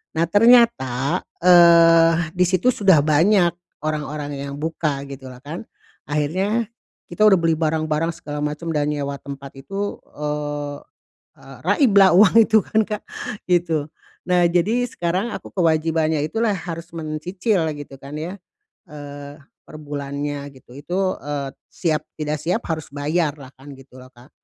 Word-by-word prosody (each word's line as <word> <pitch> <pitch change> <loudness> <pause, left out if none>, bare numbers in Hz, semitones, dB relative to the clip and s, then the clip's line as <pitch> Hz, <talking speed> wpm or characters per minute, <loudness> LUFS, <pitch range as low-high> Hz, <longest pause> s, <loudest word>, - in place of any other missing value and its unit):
Nah 165 - +2
ternyata, 185 - +3 0.2
eee, 170 -1 +7 0.2
di 180 - +4
situ 185 +6 +2
sudah 195 - +4
banyak 170 +4 +3 0.3
orang-orang 150 -1 -3
yang 140 0 -6
buka 155 -3 -2
gitulah 130 -2 -10
kan. 160 +9 -7 0.4
Akhirnya 190 +10 -1 0.4
kita 180 +5 +2
udah 195 -3 +6
beli 165 -1 +2
barang-barang 155 0 0
segala 145 -1 -7
macam 150 +3 -4
dan 150 0 +1
nyewa 140 -1 -3
tempat 140 -1 -9
itu, 195 +10 -4 0.2
eee, 145 -1 -4 0.6
eee, - - -13
raiblah 200 - +5
uang 205 +1 +6
itu 220 -1 +4
kan 220 0 +1
Kak, 210 0 -4 0.5
gitu. 165 -4 +1 0.4
Nah, 180 -1 +4
jadi 205 +9 +1
sekarang 185 +4 -2
aku - - -9
kewajibannya 160 -3 +1
itu 155 - -4
lah 220 -3 +2
harus 165 -1 -6
mencicil 170 +4 -1
gitu 145 -2 -9
kan 140 +1 -10
ya, 175 +6 -5 0.5
eee, 145 -1 -9 0.3
perbulannya 145 -1 -5
gitu 130 -1 -17
itu, 185 +6 -2
eee, 145 -1 -4 0.2
siap 160 -4 -1 0.2
tidak 150 0 -2
siap 180 +8 -1
harus 160 -2 -3
bayarlah 145 -1 -2
kan, 140 +1 -12
gitu 135 -1 -16
loh 130 - -14
Kak. 120 +3 -18
155 Hz, 140 wpm, -21 LUFS, 145-180 Hz, 0.6 s, eee